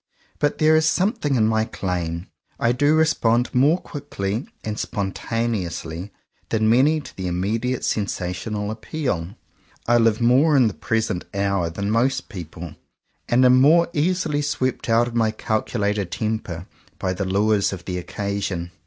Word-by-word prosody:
But 145 Hz, 0 st, +1 dB
there 155 Hz, 0 st, +4 dB
is 155 Hz, 0 st, +3 dB
something 185 Hz, -, +1 dB
in 110 Hz, -3 st, +3 dB
my 110 Hz, 0 st, +2 dB
claim. 90 Hz, -5 st, -3 dB, 0.3 s
I 115 Hz, -, +3 dB
do 145 Hz, +5 st, +3 dB
respond 125 Hz, -7 st, +2 dB
more 145 Hz, +7 st, +4 dB
quickly 110 Hz, -, -4 dB, 0.2 s
and 110 Hz, 0 st, -4 dB
spontaneous 100 Hz, -2 st, -2 dB
ly 85 Hz, +5 st, -6 dB, 0.4 s
than 110 Hz, -1 st, +1 dB
many 135 Hz, +8 st, +4 dB
to -, -, -12 dB
the 95 Hz, -1 st, -4 dB
immediate 110 Hz, +8 st, -1 dB
sensational 105 Hz, +1 st, -2 dB
appeal. 110 Hz, -, -3 dB, 0.5 s
I 120 Hz, 0 st, +4 dB
live 115 Hz, -1 st, +3 dB
more 135 Hz, +6 st, +4 dB
in 125 Hz, -3 st, +5 dB
the 105 Hz, -, -2 dB
present 110 Hz, -5 st, -1 dB
hour 100 Hz, -3 st, 0 dB
than 100 Hz, +5 st, -3 dB
most 130 Hz, +3 st, +1 dB
people; 85 Hz, -5 st, -8 dB, 0.6 s
and 125 Hz, +2 st, +4 dB
am 125 Hz, 0 st, +6 dB
more 170 Hz, +5 st, +5 dB
easily 155 Hz, -1 st, 0 dB
swept 130 Hz, -4 st, -2 dB
out 115 Hz, +1 st, +4 dB
of 120 Hz, -, -6 dB
my 115 Hz, -2 st, +2 dB
calculated 105 Hz, -2 st, -1 dB
temper 95 Hz, -4 st, -3 dB, 0.3 s
by 95 Hz, -1 st, -1 dB
the 95 Hz, -, -3 dB
lures 100 Hz, +1 st, +2 dB
of 90 Hz, -3 st, -7 dB
the 90 Hz, -1 st, -3 dB
occasion. 100 Hz, -2 st, -3 dB
110 Hz, 155 wpm, -22 LUFS, 95-130 Hz, 0.6 s, am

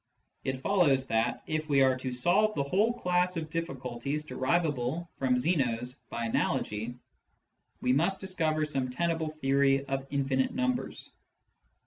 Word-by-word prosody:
It 130 Hz, -1 st, -2 dB
follows 145 Hz, -8 st, +3 dB
that, 115 Hz, +1 st, 0 dB
if 155 Hz, 0 st, -2 dB
we 140 Hz, -2 st, +4 dB
are 130 Hz, -1 st, +4 dB
to 130 Hz, 0 st, -4 dB
solve 185 Hz, +12 st, +2 dB
the 140 Hz, -, +1 dB
whole 195 Hz, +11 st, +2 dB
class 180 Hz, -5 st, 0 dB
of 155 Hz, -2 st, -4 dB
difficulties 135 Hz, -3 st, -3 dB
derivable 150 Hz, +2 st, 0 dB
from 130 Hz, -2 st, +2 dB
Zeno's 125 Hz, -5 st, +1 dB, 0.2 s
by 115 Hz, -, -3 dB
analogy, 110 Hz, +1 st, -1 dB, 0.9 s
we 125 Hz, -, +2 dB
must 170 Hz, +8 st, +2 dB
discover 165 Hz, -5 st, 0 dB
sorhe 135 Hz, -4 st, -1 dB
tenable 165 Hz, +2 st, 0 dB
theory 135 Hz, -2 st, +2 dB
of 135 Hz, 0 st, -3 dB
infinite 135 Hz, -, 0 dB
numbers. 255 Hz, -1 st, -2 dB
140 Hz, 135 wpm, -30 LUFS, 130-170 Hz, 0.9 s, we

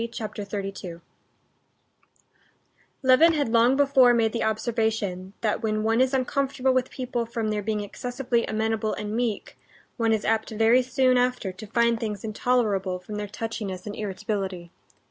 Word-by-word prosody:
Chapter 215 Hz, -2 st, -5 dB
32 195 Hz, -4 st, -6 dB, 2.0 s
Levin 265 Hz, +6 st, +6 dB
had 290 Hz, -6 st, 0 dB
long 235 Hz, +3 st, +4 dB
before 265 Hz, -4 st, +5 dB
made 225 Hz, -2 st, +2 dB
the 235 Hz, -, -1 dB
observation 220 Hz, -4 st, -1 dB
that 215 Hz, -2 st, 0 dB
when 215 Hz, -1 st, -1 dB
one 225 Hz, +2 st, +2 dB
is 260 Hz, 0 st, +3 dB
uncomfortable 265 Hz, 0 st, 0 dB
with 255 Hz, 0 st, +1 dB
people 245 Hz, -2 st, -3 dB
from 225 Hz, -1 st, -2 dB
their 210 Hz, -1 st, -1 dB
being 210 Hz, 0 st, -2 dB
excessively 245 Hz, +3 st, -2 dB
amenable 220 Hz, 0 st, -1 dB
and 210 Hz, +1 st, -4 dB
meek, 230 Hz, -3 st, -3 dB, 0.4 s
one 230 Hz, -2 st, +1 dB
is 220 Hz, -2 st, 0 dB
apt 220 Hz, 0 st, +1 dB
very 225 Hz, +3 st, +4 dB
soon 255 Hz, 0 st, +2 dB
after 250 Hz, -6 st, 0 dB
to 185 Hz, +4 st, -10 dB
find 235 Hz, +1 st, +2 dB
things 210 Hz, -4 st, -4 dB
intolerable 215 Hz, -4 st, 0 dB
from 195 Hz, +4 st, -8 dB
their 210 Hz, 0 st, -3 dB
touchiness 205 Hz, -3 st, -5 dB
and 205 Hz, -1 st, -5 dB
irritability. 195 Hz, -3 st, -4 dB
225 Hz, 150 wpm, -25 LUFS, 210-245 Hz, 2.0 s, Levin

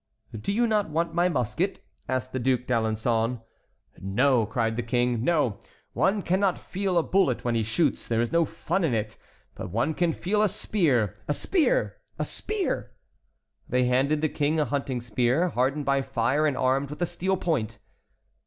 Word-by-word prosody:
"Do 110 Hz, -, -3 dB
you 235 Hz, +4 st, +2 dB
not 210 Hz, -5 st, +1 dB
want 165 Hz, +2 st, -1 dB
my 175 Hz, +1 st, +2 dB
musket?" 170 Hz, -, -2 dB, 0.2 s
said 130 Hz, -1 st, 0 dB
the 130 Hz, -, -2 dB
Duc 125 Hz, 0 st, +1 dB
d'Alençon. 115 Hz, 0 st, 0 dB, 0.6 s
"No," 115 Hz, +4 st, +2 dB
cried 115 Hz, 0 st, -1 dB
the 120 Hz, -, -1 dB
King, 120 Hz, 0 st, 0 dB
"no; 145 Hz, -10 st, +1 dB, 0.3 s
one 195 Hz, +1 st, +1 dB
cannot 185 Hz, +1 st, +1 dB
feel 190 Hz, -1 st, -2 dB
a 170 Hz, -, +4 dB
bullet 170 Hz, -13 st, +1 dB
when 120 Hz, -, +1 dB
he 115 Hz, -, +1 dB
shoots; 120 Hz, +7 st, 0 dB
there 115 Hz, -1 st, 0 dB
is 120 Hz, 0 st, 0 dB
no 170 Hz, 0 st, +4 dB
fun 165 Hz, +3 st, -2 dB
in 140 Hz, -8 st, +1 dB
it; 105 Hz, -1 st, -3 dB, 0.4 s
but -, -, -7 dB
one 115 Hz, -, 0 dB
can 175 Hz, +1 st, +1 dB
feel 200 Hz, +6 st, 0 dB
a 215 Hz, -, +3 dB
spear. 135 Hz, -, +1 dB
A 145 Hz, -, +1 dB
spear! -, -, +1 dB, 0.2 s
a -, -, -1 dB
spear!" 425 Hz, -3 st, -2 dB, 0.8 s
They 125 Hz, 0 st, +2 dB
handed 135 Hz, +5 st, +2 dB
the 155 Hz, -, +1 dB
King 150 Hz, +2 st, 0 dB
a 150 Hz, -, +2 dB
hunting 135 Hz, -1 st, -2 dB
spear 125 Hz, +9 st, +1 dB
hardened 135 Hz, +2 st, 0 dB
by 140 Hz, 0 st, +2 dB
fire 135 Hz, +3 st, +1 dB
and 140 Hz, -4 st, -1 dB
armed 135 Hz, +2 st, +1 dB
with 150 Hz, +4 st, -4 dB
a -, -, +3 dB
steel 190 Hz, +3 st, -1 dB
point. 120 Hz, -, -1 dB
140 Hz, 180 wpm, -26 LUFS, 120-175 Hz, 0.8 s, a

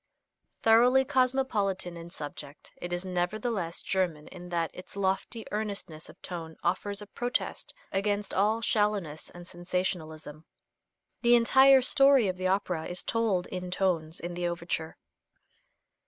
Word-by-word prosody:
Thoroughly 245 Hz, +4 st, +6 dB
cosmopolitan 255 Hz, -9 st, +1 dB
in 170 Hz, 0 st, -9 dB
subject, 145 Hz, -2 st, -8 dB
it 175 Hz, -, -6 dB
is 175 Hz, +1 st, -2 dB
nevertheless 185 Hz, 0 st, -2 dB
German 175 Hz, -6 st, -1 dB
in 180 Hz, -1 st, -10 dB
that 170 Hz, -2 st, -1 dB
its 180 Hz, -, -11 dB
lofty 200 Hz, +4 st, -1 dB
earnestness 200 Hz, -7 st, -4 dB
of -, -, -15 dB
tone 165 Hz, -3 st, -6 dB
offers 200 Hz, +3 st, -1 dB
a -, -, -9 dB
protest 245 Hz, +4 st, -3 dB, 0.2 s
against 205 Hz, +1 st, -1 dB
all 215 Hz, +4 st, +2 dB
shallowness 205 Hz, -8 st, 0 dB
and 175 Hz, 0 st, -11 dB
sensationalism. 170 Hz, -4 st, -4 dB, 0.8 s
The 240 Hz, 0 st, +6 dB
entire 265 Hz, +3 st, +6 dB
story 275 Hz, -3 st, +5 dB
of 185 Hz, -1 st, -2 dB
the 185 Hz, 0 st, -1 dB
opera 185 Hz, -4 st, 0 dB
is 175 Hz, 0 st, -2 dB
told 220 Hz, -6 st, 0 dB
in 180 Hz, -1 st, -5 dB
tones 175 Hz, -4 st, -1 dB
in 175 Hz, +1 st, -5 dB
the 175 Hz, 0 st, -2 dB
overture. 170 Hz, -2 st, -3 dB
185 Hz, 135 wpm, -29 LUFS, 175-215 Hz, 0.8 s, Thoroughly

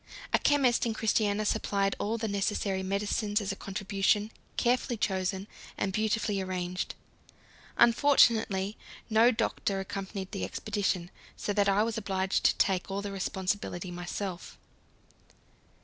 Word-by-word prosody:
A -, -, +5 dB
chemist 260 Hz, -5 st, +3 dB
in 225 Hz, -, -2 dB
Christiania 215 Hz, -1 st, +1 dB
supplied 200 Hz, -1 st, +1 dB
all 220 Hz, +3 st, -1 dB
the 225 Hz, 0 st, -2 dB
necessary 200 Hz, -1 st, -1 dB
medicines 205 Hz, +2 st, 0 dB
as 200 Hz, -2 st, -2 dB
a -, -, -4 dB
contribution, 200 Hz, +2 st, 0 dB, 0.3 s
carefully 245 Hz, 0 st, +1 dB
chosen, 190 Hz, -1 st, -1 dB, 0.3 s
and 195 Hz, -, -1 dB
beautifully 215 Hz, -1 st, 0 dB
arranged. 185 Hz, -1 st, -3 dB, 0.8 s
Unfortunately 225 Hz, -6 st, +4 dB, 0.3 s
no 225 Hz, +2 st, +6 dB
doctor 225 Hz, -4 st, -1 dB
accompanied 195 Hz, 0 st, -5 dB
the 200 Hz, -, -4 dB
expedition, 195 Hz, -4 st, -2 dB, 0.3 s
so 205 Hz, -, -2 dB
that 200 Hz, -1 st, +3 dB
I 200 Hz, +2 st, +4 dB
was 225 Hz, 0 st, -1 dB
obliged 190 Hz, -2 st, -1 dB
to -, -, +5 dB
take 190 Hz, -1 st, +1 dB
all 195 Hz, +1 st, -3 dB
the 205 Hz, -, -4 dB
responsibility 190 Hz, -1 st, -3 dB
myself. 175 Hz, +1 st, -5 dB
200 Hz, 130 wpm, -29 LUFS, 190-220 Hz, 0.8 s, no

